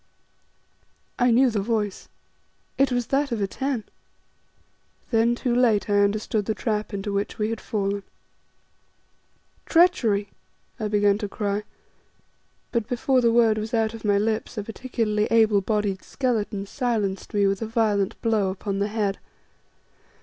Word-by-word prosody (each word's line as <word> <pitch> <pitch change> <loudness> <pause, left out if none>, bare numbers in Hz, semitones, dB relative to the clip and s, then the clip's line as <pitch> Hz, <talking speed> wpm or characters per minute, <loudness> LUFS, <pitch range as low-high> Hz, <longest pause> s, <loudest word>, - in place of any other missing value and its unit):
I 245 - +4
knew 245 +2 +4
the 215 - 0
voice; 210 -2 -2 0.7
it 275 0 +2
was 245 -1 0
that 280 0 +1
of 230 - -1
Atene! 235 +4 -2 1.3
Then 230 +1 +3
too 245 0 -1
late 230 -4 +2
I 205 - +4
understood 205 +1 +1
the 220 - -1
trap 215 -2 -2
into 200 0 -4
which 200 +1 -2
we 215 +1 -1
had 225 - -4
fallen. 200 -2 -2 1.7
"Treachery!" 230 - +3 0.5
I 215 - -1
began 205 -1 +2
to 205 -2 -4
cry, 205 0 -2 1.1
and 230 -3 0
before 255 +1 +1
the 235 -1 +3
word 230 -2 +4
was 220 +3 -3
out 225 -1 +1
of 225 - -9
my 205 -2 +3
lips, 215 +2 -1
a 210 - -2
particularly 225 -2 -1
able 220 -3 +4
bodied 205 -2 -1
skeleton 215 -6 -2
silenced 210 -5 -2
me 205 -1 +3
with 195 +1 0
a 225 - -2
violent 215 -3 0
blow 220 -4 +2
upon 195 +1 -3
the 200 - +1
head. 210 -2 -1
215 Hz, 145 wpm, -24 LUFS, 205-235 Hz, 1.7 s, I